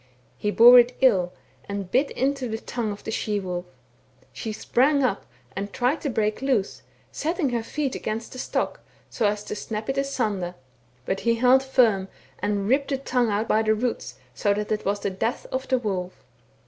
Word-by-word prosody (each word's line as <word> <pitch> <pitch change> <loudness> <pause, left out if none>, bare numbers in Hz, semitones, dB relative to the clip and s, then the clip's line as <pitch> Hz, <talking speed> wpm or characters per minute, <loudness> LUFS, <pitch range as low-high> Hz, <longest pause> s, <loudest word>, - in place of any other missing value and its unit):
He 210 - -2
bore 240 +4 +9
it 245 +1 +2
ill, 185 -9 +4 0.4
and 200 -2 -4
bit 275 +3 +3
into 270 -1 -1
the 220 - -2
tongue 225 -1 -3
of 205 - -8
the - - -4
she 210 -1 -1
wolf; 180 -2 -4 0.7
she 220 - -5
sprang 275 +6 +2
up 225 -6 -1 0.3
and 200 +1 -4
tried 255 +7 0
to 290 - -2
break 215 -2 0
loose, 255 -8 0 0.3
setting 325 -2 -1
her 235 -1 0
feet 275 +4 -3
against 225 +2 -4
the 255 - -8
stock, - - -2 0.3
so 225 - +1
as 205 0 -1
to - - -5
snap 215 +2 -5
it 270 - 0
asunder: 210 -10 -1 0.5
but 190 +6 -1
he 230 0 +2
held 250 +3 +5
firm, 235 -8 +3 0.3
and 205 0 -1
ripped 275 +4 +2
the 275 - 0
tongue 250 -3 0
out 210 +2 0
by 220 - +3
the 220 0 +2
roots, 235 +2 -3 0.2
so 205 -1 +1
that 210 +1 -3
it 215 0 -1
was 200 +1 0
the 200 - -1
death 225 +7 -2
of 260 0 -3
the 260 - +2
wolf. 190 -6 -4
225 Hz, 195 wpm, -25 LUFS, 205-260 Hz, 0.7 s, bore